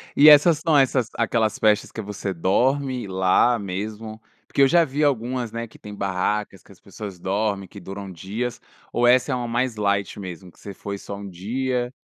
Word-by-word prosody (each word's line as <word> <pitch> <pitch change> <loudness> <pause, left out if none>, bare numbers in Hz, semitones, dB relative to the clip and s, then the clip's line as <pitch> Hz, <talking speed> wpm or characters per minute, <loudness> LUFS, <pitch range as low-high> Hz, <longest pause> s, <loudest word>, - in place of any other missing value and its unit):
E 150 +2 +8
essas 150 +1 +7
são 160 -2 +2
essas 130 -3 +2
aquelas 115 -2 0
festas 105 -1 +2
que 110 - -5
você 100 -1 -5
dorme 125 +7 0
lá 95 +6 +3
mesmo? 110 +3 -6 0.3
Porque - - 0
eu 135 - +7
já 170 +3 +5
vi 145 +2 -2
algumas, 125 -3 0
né, 115 0 -5
que - - -18
têm 105 - -10
barracas, 100 +1 -2
que - - -19
as 95 - -17
pessoas 100 -1 -9
dormem, 100 +1 -1
que 100 - -12
duram 95 +1 -8
dias, 105 +8 -5 0.3
ou 120 0 +2
essa 125 +1 +4
é - - +1
uma 120 -1 -3
mais 120 +1 -1
light 100 -1 -1
mesmo, 90 -1 -8
você 100 - -9
foi 100 +1 -6
só 100 - -7
um 100 0 -8
dia? 125 +7 -2
110 Hz, 195 wpm, -23 LUFS, 100-125 Hz, 0.3 s, E